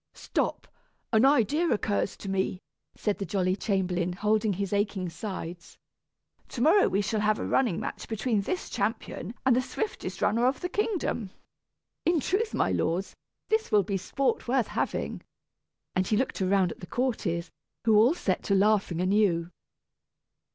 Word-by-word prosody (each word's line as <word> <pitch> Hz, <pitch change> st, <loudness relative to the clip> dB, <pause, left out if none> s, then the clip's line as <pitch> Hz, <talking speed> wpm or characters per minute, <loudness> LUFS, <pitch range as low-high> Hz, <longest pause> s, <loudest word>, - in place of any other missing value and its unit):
"Stop! -, -, -2 dB, 0.5 s
An 220 Hz, +1 st, +5 dB
idea 290 Hz, -, +3 dB
occurs 205 Hz, -2 st, 0 dB
to -, -, -9 dB
me," 190 Hz, -1 st, -1 dB, 0.4 s
said 210 Hz, -2 st, -1 dB
the -, -, -1 dB
jolly 185 Hz, -2 st, 0 dB
chamberlain, 180 Hz, -4 st, 0 dB
holding 210 Hz, +2 st, +1 dB
his 195 Hz, +1 st, -3 dB
aching 200 Hz, -3 st, 0 dB
sides. 175 Hz, -1 st, -7 dB, 0.7 s
"To 240 Hz, -, -5 dB
morrow 335 Hz, +9 st, +5 dB
we 195 Hz, -, +1 dB
shall 210 Hz, +2 st, -1 dB
have 215 Hz, 0 st, +2 dB
a -, -, -3 dB
running 245 Hz, -10 st, +1 dB
match -, -, -5 dB
between 220 Hz, -1 st, 0 dB
this 360 Hz, -, -3 dB
champion 210 Hz, 0 st, -3 dB
and 260 Hz, -2 st, +5 dB
the 255 Hz, -, +3 dB
swiftest 425 Hz, -, -4 dB
runner 235 Hz, +4 st, +3 dB
of 265 Hz, -, 0 dB
the 360 Hz, -, -2 dB
kingdom. 360 Hz, -, -1 dB, 0.7 s
In 340 Hz, -1 st, +3 dB
truth, 420 Hz, -, 0 dB
my -, -, +1 dB
lords, 180 Hz, +4 st, -1 dB, 0.3 s
this 440 Hz, 0 st, +1 dB
will 210 Hz, -1 st, +5 dB
be 200 Hz, +1 st, -2 dB
sport 250 Hz, +10 st, -1 dB
worth 250 Hz, -1 st, +1 dB
having," -, -, -2 dB, 0.7 s
and 185 Hz, 0 st, +1 dB
he 215 Hz, -, +2 dB
looked 260 Hz, -4 st, -1 dB
around 190 Hz, -1 st, +2 dB
at -, -, -10 dB
the 180 Hz, -, -9 dB
courtiers, 185 Hz, -10 st, -1 dB, 0.3 s
who 220 Hz, -2 st, +5 dB
all 235 Hz, +9 st, +5 dB
set 190 Hz, -, -1 dB
to 200 Hz, -, +2 dB
laughing 195 Hz, -4 st, +2 dB
anew. 185 Hz, -3 st, +2 dB
210 Hz, 160 wpm, -28 LUFS, 190-245 Hz, 0.7 s, An